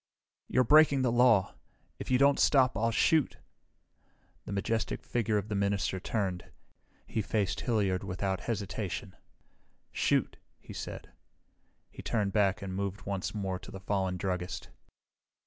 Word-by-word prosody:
"You're 130 - +3
breaking 145 0 +5
the 125 - +2
law. 120 -5 +4 0.5
If - - -6
you 130 - +4
don't 140 +1 +4
stop 130 -3 +4
I'll 115 +3 +1
shoot!" 150 +5 +2 1.1
The - - -7
majestic 110 +3 -2
figure 110 -3 0
of 100 0 -2
the 110 - -4
minister 100 -1 0
turned. 95 -3 -3 0.6
He 110 - -2
faced 100 -3 -1
Hilliard 100 -6 0
without 95 0 -2
hesitation. 100 -4 -4 0.8
"Shoot," - - +1 0.2
he - - -11
said. - - -7 0.8
He - - -9
turned 105 -4 -1
back 100 -2 +2
and 95 -1 -5
moved 100 0 -3
once 100 +1 -3
more 95 -3 -2
to - - -12
the 95 - -8
fallen 95 -1 -1
druggist. 90 -2 -3
100 Hz, 140 wpm, -30 LUFS, 95-115 Hz, 1.1 s, breaking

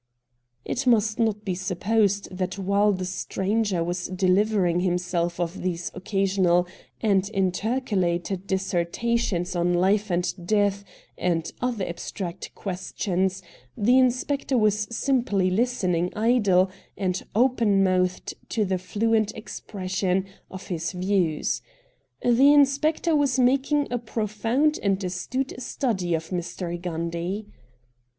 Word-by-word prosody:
It 260 +2 -2
must 220 -2 +3
not 215 -2 0
be 190 - -1
supposed 200 +2 0
that 185 0 -3
while 200 +2 +2
the 185 -2 -2
stranger 190 0 -1
was 175 +1 -3
dehvering 185 -1 +2
himself 175 -1 -1
of 175 +1 -3
these 175 -1 -2
occa 195 +1 -2
sional 180 -2 +3 0.3
and 200 -3 +2
intercalated 190 -2 0
dissertations 190 +1 -1
on 175 0 +2
life 200 +4 +2
and 175 0 -2
death 205 -1 +2 0.4
and 165 -2 0
other 240 -6 -1
abstract 175 +1 -6
questions, 190 0 -2 0.3
the 245 +5 +4
inspector 260 +2 +1
was 210 -1 +2
simply 235 -7 +1
listening 185 -6 +1
idle 205 -5 +3 0.3
and 185 -2 -1
open 225 -5 +3
mouthed 185 -1 0 0.2
to 215 -2 0
the 185 -1 -1
fluent 215 +3 +1
expression 190 -3 -2 0.2
of 190 0 -9
his 170 -2 -3
views. 180 -4 0 0.6
The 250 +4 +6
inspector 295 +3 +3
was 280 -3 +2
making 275 +3 +2
a 245 - 0
pro 225 -1 -3
found 235 +9 +1
and 195 -2 +2
astute 250 +9 -3
study 190 -10 -1
of 160 0 -5
Mr. 175 -1 -4
Gundy. 170 +4 -3
195 Hz, 120 wpm, -25 LUFS, 180-225 Hz, 0.6 s, The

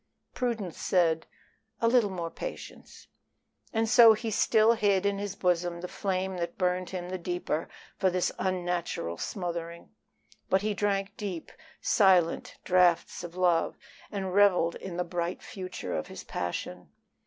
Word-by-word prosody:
Prudence 225 -8 -3
said, 165 -3 +2 0.5
"A 230 - +2
little 230 -3 +4
more 170 -3 -4
patience;" - - -8 0.7
and 225 0 +1
so 230 -1 +8
he 220 +1 -3
still 220 +2 +4
hid 200 -3 +2
in 200 0 +1
his 200 -1 -4
bosom 175 -2 0
the 180 - -4
flame 190 0 -2
that 170 -1 -4
burned 180 0 0
him 180 -1 -5
the 185 0 -4
deeper 175 -2 -2 0.3
for 190 - +3
this 180 0 0
unnatural 175 - -2
smothering. 170 -3 -5 0.6
But 190 +1 +2
he 215 0 0
drank 200 -1 -1
deep, 185 -6 -5 0.3
silent 185 -5 +3
draughts 180 -1 +3
of 175 0 -8
love, 175 -2 +2 0.3
and 190 -3 -3
reveled 190 -4 +4
in 180 -2 -7
the 180 - +1
bright 175 0 -3
future 185 - -6
of 75 - -2
his - - -9
passion. 90 0 -5
185 Hz, 145 wpm, -29 LUFS, 175-200 Hz, 0.7 s, so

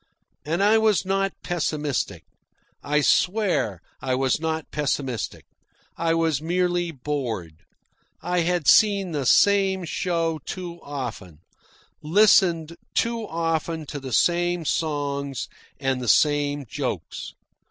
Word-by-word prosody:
And 165 +7 0
I 215 +2 +5
was 215 -4 +2
not 195 0 0
pessimistic. 155 -5 -2 0.6
I 150 +1 +1
swear 180 - +1 0.2
I 130 0 0
was 130 +1 +1
not 160 -1 -3
pessimistic. 135 -5 -2 0.5
I 165 0 +1
was 160 -4 +1
merely 175 +1 0
bored. 125 - -4 0.6
I 180 0 -1
had 175 -2 0
seen 200 -4 +5
the 145 -5 -2
same 195 -2 +4
show 165 -2 -1
too 175 +3 -7
often, 115 - -7 0.6
listened 170 -2 +4 0.2
too 230 -2 0
often 165 -1 -2
to 145 0 -6
the 130 -1 -7
same 175 +3 +2
songs 140 -4 -2 0.3
and 135 -2 -1
the 125 - -4
same 145 +1 +2
jokes. - - -4
160 Hz, 115 wpm, -24 LUFS, 140-180 Hz, 0.6 s, I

